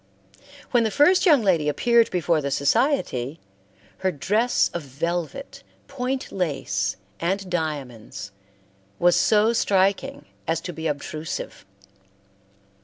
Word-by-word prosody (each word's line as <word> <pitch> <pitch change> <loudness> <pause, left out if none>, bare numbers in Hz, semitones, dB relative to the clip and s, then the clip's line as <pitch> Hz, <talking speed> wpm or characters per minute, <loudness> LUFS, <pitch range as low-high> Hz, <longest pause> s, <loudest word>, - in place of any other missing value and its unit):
When 240 -2 +4
the 220 - +1
first 355 - +4
young 290 -8 +5
lady 165 -7 +2
appeared 235 +8 +3
before 170 -3 +1
the 140 - -2
society, 145 - 0 0.6
her 190 0 +1
dress 210 - +1
of 175 - -3
velvet, 170 - -4 0.3
point 265 -1 -3
lace, 105 - -2 0.2
and 190 +3 -1
diamonds, 130 - -4 0.7
was 175 0 +4
so 215 +1 +3
striking 200 +7 +1 0.2
as 165 0 +1
to 175 - -6
be 160 0 -4
obtrusive. 155 -2 -5
175 Hz, 110 wpm, -24 LUFS, 150-235 Hz, 0.7 s, young